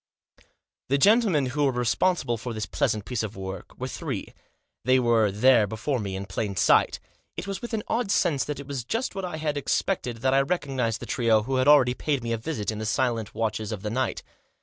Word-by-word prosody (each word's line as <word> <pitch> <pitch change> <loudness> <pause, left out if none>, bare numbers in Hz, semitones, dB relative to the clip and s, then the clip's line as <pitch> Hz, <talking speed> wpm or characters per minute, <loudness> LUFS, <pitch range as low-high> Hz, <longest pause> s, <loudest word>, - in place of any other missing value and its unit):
The 140 - +3
gentlemen 200 - +4
who 145 0 +1
were 140 - +3
responsible 125 +3 +1
for 115 +1 -5
this 110 - -2
plea - - 0
sant 105 -2 -2
piece 125 -3 -2
of 110 -1 -5
work 95 -1 -7
were - - -4
three. - - -5 0.5
They 130 +2 +4
were 115 -4 +3
there 110 +1 +4
before 110 +6 -2
me 100 -3 -4
in 95 +1 -4
plain 100 +1 -3
sight. - - +3 0.4
It - - -4
was 195 -1 -5
with 240 -1 -3
an 210 - -3
odd 230 -3 -1
sense 165 -8 +2
that 145 -1 -4
it 140 - -7
was 135 -3 -4
just 225 - -2
what 195 -1 -4
I 175 -3 -5
had 150 -2 -2
expected 125 - -1
that 130 0 +3
I 135 - +5
recognised 135 -7 -1
the - - -5
trio 115 -3 +2
who 130 +3 -1
had 130 +1 +2
already 140 -4 +6
paid 140 -1 -1
me 115 - -3
a - - 0
visit 115 -5 -3
in 110 - -5
the 110 - -3
silent 115 -2 -1
watches 110 -1 -2
of 105 -2 -5
the 105 - -3
night. 130 +3 -1
125 Hz, 225 wpm, -26 LUFS, 110-145 Hz, 0.5 s, already